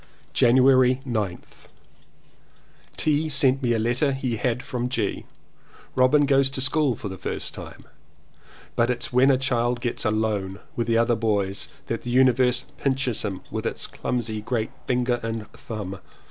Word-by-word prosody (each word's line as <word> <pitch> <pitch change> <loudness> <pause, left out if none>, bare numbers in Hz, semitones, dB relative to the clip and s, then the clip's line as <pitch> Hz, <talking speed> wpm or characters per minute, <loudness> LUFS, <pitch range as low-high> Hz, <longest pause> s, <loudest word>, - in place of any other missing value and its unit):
January 130 +1 +5
9th. 105 -8 -4 1.3
T. 155 +1 +1
sent 135 -2 +2
me 120 -2 +2
a - - +1
letter 120 +5 +1
he 130 -3 -2
had 125 +2 -1
from 125 0 -3
G. - - -2 0.7
"Robin 130 +3 +4
goes 135 -1 +4
to 135 - -2
school 135 0 +2
for 105 - -6
the 95 -2 -7
first - - -4
time; - - -10 0.9
but 120 +1 +2
it's 125 0 -1
when 130 +2 +5
a 135 - +5
child 120 -2 0
gets 120 0 -2
'alone' 105 -3 -1 0.2
with 115 -1 -1
the 115 -1 +3
other 115 +1 +3
boys 100 -3 -1 0.2
that 115 - -3
the 120 - -6
Universe 125 0 +3
pinches 130 -4 0
him 95 -3 -3
with - - -2
its - - -2
clumsy 115 -3 -3
great 115 0 -2 0.2
finger 125 -1 +1
and 115 -1 -4
thumb. 100 -4 -6
120 Hz, 155 wpm, -24 LUFS, 110-130 Hz, 1.3 s, January